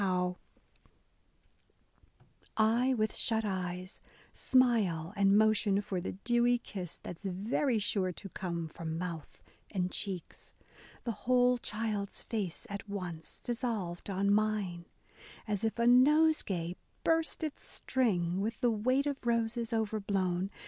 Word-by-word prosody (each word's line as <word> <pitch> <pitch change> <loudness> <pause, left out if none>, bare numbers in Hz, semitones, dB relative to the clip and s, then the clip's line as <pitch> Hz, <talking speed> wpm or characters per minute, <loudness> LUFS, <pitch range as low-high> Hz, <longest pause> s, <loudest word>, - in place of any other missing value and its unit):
BROWNING 180 -2 +1 1.1
— - - -35
I, 230 +4 +3
with 215 -2 0
shut 225 -1 +1
eyes, 185 -1 -4 0.3
smile 210 -10 +2
and 200 0 +5
motion 215 -2 +4
for 195 -3 -3
The - - -4
dewy 240 +4 +2
kiss 190 -7 -6
that's 180 +3 -9
very 220 +7 0
sure 200 -3 0
to 195 +3 -9
come 170 -3 -3
From 160 0 -5
mouth 170 -3 -6 0.3
and 185 -3 -1
cheeks, 190 -4 -5 0.5
the 235 - -1 0.2
whole 250 0 +5
child's 210 -3 -3
face 200 -7 -3
at 200 +1 -7
once 175 -5 -6
Dissolved 225 -8 -3
on 200 +1 +2
mine, 205 -5 0 0.3
— - - -19
as 205 -1 -1
if 225 +1 0
a 235 - +2
nosegay 250 - +4 0.3
burst 325 0 +1
Its 305 -2 -4
string 190 -8 0
with 220 +3 -2
the 245 -2 +3
weight 255 +6 +2
of 285 -2 -3
roses 230 0 0
over 220 -1 0
blown. 190 -2 0
205 Hz, 135 wpm, -32 LUFS, 185-235 Hz, 1.1 s, and